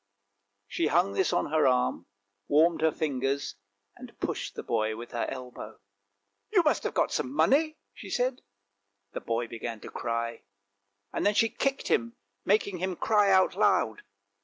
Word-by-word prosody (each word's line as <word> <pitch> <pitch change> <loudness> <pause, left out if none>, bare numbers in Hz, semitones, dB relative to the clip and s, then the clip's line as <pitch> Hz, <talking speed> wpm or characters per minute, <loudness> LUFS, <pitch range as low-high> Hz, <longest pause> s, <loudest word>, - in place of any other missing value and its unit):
She 165 - 0
hung 175 +6 +2
this 190 - +1
on 175 -4 0
her 155 -2 +4
arm, 125 -9 +1 0.4
warmed 160 +3 +3
her 160 0 +4
fingers, 140 -2 -2 0.4
and - - -13
pushed - - -3
the - - -5
boy 110 0 0
with 120 +1 -9
her 120 - -2
elbow. 125 -1 -8 0.4
" - - -50
You 375 -5 +4
must 305 - +2
have - - -2
got - - +2
some 260 - -2
money," 310 +2 +3 0.2
she - - -10
said. 250 +1 0 0.7
The - - -4
boy 115 +1 -2
began 115 0 -6
to - - -9
cry, 115 0 -3 0.7
and - - -1
then 205 0 +3
she 225 - +4
kicked 275 +3 -2
him, 115 0 +1 0.3
making 200 -2 +1
him 185 0 -2
cry 210 +2 +3
out 190 -1 +4
loud. 110 -1 +2
160 Hz, 165 wpm, -28 LUFS, -, 0.7 s, her